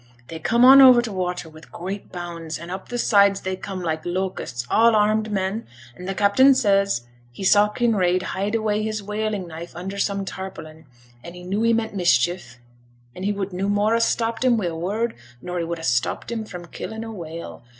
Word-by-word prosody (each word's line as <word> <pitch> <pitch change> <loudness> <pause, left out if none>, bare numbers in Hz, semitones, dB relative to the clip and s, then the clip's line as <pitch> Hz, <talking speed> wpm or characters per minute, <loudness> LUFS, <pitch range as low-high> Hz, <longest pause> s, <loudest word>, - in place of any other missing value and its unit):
they 160 - -6
coome 235 +9 +3
on 270 +1 +10
over 255 -2 +9
t' 240 -2 -2
watters 180 -4 -4
wi' 155 - -13
great 190 +3 -6
bounds, 170 -3 -6
and 170 +2 -9
up 190 +1 -7
t' 245 - -3
sides 200 -4 +4
they 190 0 -3
coome 185 -1 -6
like 160 -2 -2
locusts, 175 -9 -3
all 230 - +4
armed 215 +1 +2
men; 195 +3 -2 0.3
an' 180 - -9
t' 195 - -2
captain 260 +8 +5
says 200 - +2 0.3
he 120 - -8
saw 205 +2 +5
Kinraid 195 -6 +1
hide 200 +3 -2
away 215 -1 0
his 215 -1 -3
whaling 210 -2 -3
knife 170 +1 -9
under 190 +3 -6
some 200 -1 -1
tarpaulin', 160 -5 -8 0.4
and 170 +1 -10
he 180 - -10
knew 195 +4 -2
he 230 0 +3
meant 225 -1 0
mischief, 175 -6 +1 0.6
an' 180 - -10
he 200 +2 0
would 200 -2 -4
no 190 +2 -2
more 205 +2 +2
ha' - - +2
stopped 230 0 0
him 250 -2 +4
wi' 210 - -1
a 170 -2 -2
word 210 +8 -2 0.3
nor 180 +6 -4
he 170 - -2
would 170 +1 -4
ha' 165 - -10
stopped 130 - -1
him 225 -2 -3
fra' 180 -4 -9
killing 220 +3 -6
a 225 - -7
whale. 170 -5 -8
195 Hz, 210 wpm, -23 LUFS, 175-215 Hz, 0.6 s, on